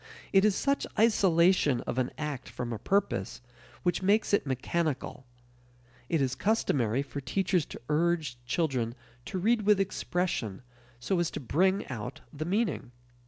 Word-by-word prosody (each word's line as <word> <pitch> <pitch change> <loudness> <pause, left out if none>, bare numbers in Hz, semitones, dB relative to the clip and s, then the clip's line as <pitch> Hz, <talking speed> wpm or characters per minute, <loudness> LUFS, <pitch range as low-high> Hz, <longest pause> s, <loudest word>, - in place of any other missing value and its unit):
It 195 0 +6
is 210 -2 +4
such 280 0 0
isolation 180 - +4
of 130 - -3
an 125 - 0
act 150 -4 -4
from 120 -1 -4
a 110 - -5
purpose 195 - 0 0.4
which 175 +1 +1
makes 205 +3 +2
it 200 - +3
mechanical. 135 0 -2 0.8
It 165 -3 +2
is 130 -1 0
customary 135 - +1
for 140 0 -6
teachers 180 +4 0
to - - -9
urge 155 -5 0
children 125 -7 0 0.3
to - - -4
read 220 +5 +2
with 210 -1 +4
expression, 175 - -2 0.4
so 175 +9 0
as 175 - +1
to - - -5
bring 185 - +1
out 115 -7 -6
the 155 +1 -4
meaning. 200 - -1
165 Hz, 150 wpm, -29 LUFS, 130-195 Hz, 0.8 s, It